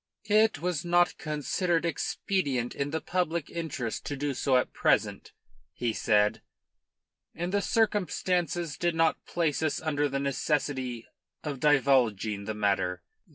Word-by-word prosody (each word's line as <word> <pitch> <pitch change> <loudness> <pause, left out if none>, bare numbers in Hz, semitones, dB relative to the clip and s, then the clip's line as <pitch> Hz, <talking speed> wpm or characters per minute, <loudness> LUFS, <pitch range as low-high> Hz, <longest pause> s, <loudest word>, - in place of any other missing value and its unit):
"It 215 +1 +4
was 175 -3 -1
not 175 0 +2
considered 165 +3 -1
expedient 150 -5 -1
in 140 +1 -2
the 160 +2 -2
public 170 -4 -1
interest 140 -9 -4
to 145 - -3
do 145 0 -1
so 130 0 +2
at 125 - -1
present," - - +1 0.4
he 120 -2 -1
said. 105 0 +2 0.9
"And 175 +2 -3
the 200 - +2
circumstances 180 - 0
did 175 -1 0
not 165 -1 +2
place 165 -4 0
us 155 -3 0
under 145 -2 0
the 140 0 -2
necessity 135 -3 -1 0.4
of 145 -4 -4
divulging 125 -8 +2
the 110 - -3
matter." 95 -4 0
145 Hz, 135 wpm, -28 LUFS, 125-175 Hz, 0.9 s, It